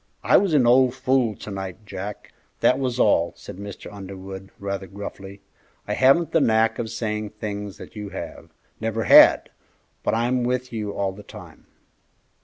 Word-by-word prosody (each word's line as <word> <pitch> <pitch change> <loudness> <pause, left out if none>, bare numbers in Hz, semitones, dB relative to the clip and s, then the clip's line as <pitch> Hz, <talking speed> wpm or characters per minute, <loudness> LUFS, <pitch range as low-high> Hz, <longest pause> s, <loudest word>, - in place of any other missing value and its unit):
"I - - +4
was 190 -6 +2
an 130 -4 +4
old 125 +1 +4
fool 130 -4 +1
to 105 - -9
night, 95 +1 -6
Jack; 100 +1 -7 0.3
that 125 - +4
was 125 -2 -2
all," 85 -7 +3
said - - -10
Mr. 100 0 -9
Underwood, 95 -1 -9
rather 100 -1 -4
gruffly. 100 0 -9 0.5
"I - - -1
haven't 140 +5 +4
the 165 - +3
knack 110 -1 +2
of 115 -2 -3
saying 110 -2 -3
things 105 -2 -5
that - - -12
you 105 -1 -6
have, - - -8 0.3
never 115 0 -2
had, - - +7 0.5
but - - 0
I'm 120 +2 +1
with 125 0 -2
you 105 -2 -3
all 100 -1 -2
the 100 +2 -11
time." - - -13
105 Hz, 170 wpm, -23 LUFS, 100-125 Hz, 0.5 s, had